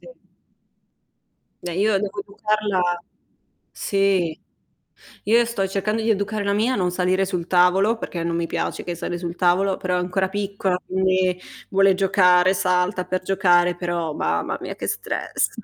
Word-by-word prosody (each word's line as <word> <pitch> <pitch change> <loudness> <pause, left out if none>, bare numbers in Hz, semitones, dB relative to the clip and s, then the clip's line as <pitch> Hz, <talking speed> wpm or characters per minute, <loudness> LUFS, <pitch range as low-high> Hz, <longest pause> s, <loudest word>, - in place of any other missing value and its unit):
Si. - - -17 1.6
Beh, 175 -1 -4
io 200 +2 +2
devo 205 0 -4
educarla 200 -3 -1 0.7
sì, 195 -5 0 0.9
io 235 +3 +4
sto 230 -5 -2
cercando 205 +3 -1
di 225 - -1
educare 205 0 0
la 200 0 0
mia 220 +5 +1
a - - 0
non 180 -2 0
salire 185 +1 +1
sul 180 -3 -3
tavolo, 185 +5 +3
perché 170 -6 -4
non 170 0 -1
mi 170 0 -1
piace - - -3
che 175 - -4
sali 175 +1 -4
sul 170 -1 -5
tavolo, 185 +2 +2
però 180 -1 -1
è - - +1
ancora 180 +2 0
piccola 195 -2 -2
quindi 185 -1 +1 0.3
vuole 195 0 +4
giocare, 185 -1 +4
salta 180 +1 0
per 185 0 -2
giocare. 180 -2 +3
Però, 170 -3 -3
mamma - - -1
mia, - - -6
che - - -5
stress. - - -2
185 Hz, 155 wpm, -22 LUFS, 180-200 Hz, 1.6 s, io